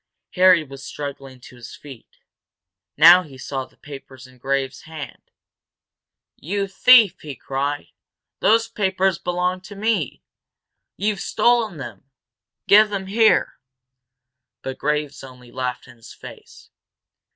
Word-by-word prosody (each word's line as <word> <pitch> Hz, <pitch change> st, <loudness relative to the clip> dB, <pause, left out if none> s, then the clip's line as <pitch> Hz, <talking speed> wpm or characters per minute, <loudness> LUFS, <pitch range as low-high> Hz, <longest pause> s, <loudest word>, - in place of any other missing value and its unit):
Harry 180 Hz, -3 st, +5 dB
was 135 Hz, -1 st, -12 dB
struggling 135 Hz, -3 st, -8 dB
to 125 Hz, -, -15 dB
his 120 Hz, -1 st, -11 dB
feet. 135 Hz, -6 st, -14 dB, 0.8 s
Now 170 Hz, +4 st, +8 dB
he 145 Hz, -7 st, -13 dB
saw 135 Hz, 0 st, -5 dB
the -, -, -27 dB
papers 135 Hz, -3 st, -12 dB
in 130 Hz, -1 st, -19 dB
Graves' 135 Hz, 0 st, -2 dB
hand. 155 Hz, -3 st, -10 dB, 1.1 s
"You 200 Hz, +5 st, -3 dB
thief!" 205 Hz, -1 st, +5 dB
he 145 Hz, -3 st, -8 dB
cried. 140 Hz, +4 st, -4 dB, 0.5 s
"Those 225 Hz, +1 st, +3 dB
papers 190 Hz, -4 st, 0 dB
belong 180 Hz, +1 st, -2 dB
to 205 Hz, +2 st, -12 dB
me! 200 Hz, -, -2 dB, 0.7 s
You've 205 Hz, 0 st, -1 dB
stolen 235 Hz, -7 st, +1 dB
them! 125 Hz, -2 st, -10 dB, 0.6 s
Give 210 Hz, +1 st, +6 dB
them 195 Hz, -2 st, -4 dB
here!" 220 Hz, +3 st, +2 dB, 1.0 s
But 130 Hz, 0 st, -6 dB
Graves 150 Hz, -1 st, -2 dB
only 125 Hz, -2 st, -14 dB
laughed 125 Hz, -1 st, -5 dB
in 120 Hz, -, -16 dB
his 115 Hz, -, -14 dB
face. -, -, -14 dB
150 Hz, 125 wpm, -21 LUFS, 135-195 Hz, 1.1 s, Now